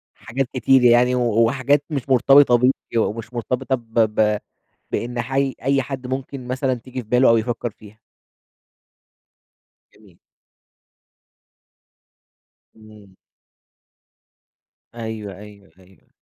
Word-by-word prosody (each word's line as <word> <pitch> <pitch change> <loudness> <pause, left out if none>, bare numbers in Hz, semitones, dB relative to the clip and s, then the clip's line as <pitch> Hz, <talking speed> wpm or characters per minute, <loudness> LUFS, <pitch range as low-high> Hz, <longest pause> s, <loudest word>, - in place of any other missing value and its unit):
حاجات 130 +2 -4
كتير 130 +1 +3
يعني، 120 +1 +5
و 125 - 0 0.3
وحاجات 140 +4 +1
مش 140 -4 -4
مرتبطة 130 0 +5
بيك، 125 +2 +3 0.2
ومش 115 +1 -2
مرتبطة 125 +2 -2
ب 115 -3 -8
ب 105 -1 +2 0.5
بإن 120 0 -3
حي 135 +2 -1
أي 135 +1 +1
حد 130 -2 -6
ممكن 130 0 -6
مثلًا 130 +1 -1
تيجي 125 +1 -8
في 110 - -22
باله 125 +2 +4
أو 115 - +5
يفكر 120 +1 -2
فيها. 105 0 -17 2.0
جميل. - - -22 2.6
امم. 105 -3 -17 1.8
أيوه 110 -4 -7
أيوه 100 -3 -15
أيوه. 95 0 -24
120 Hz, 105 wpm, -21 LUFS, 110-130 Hz, 2.6 s, يعني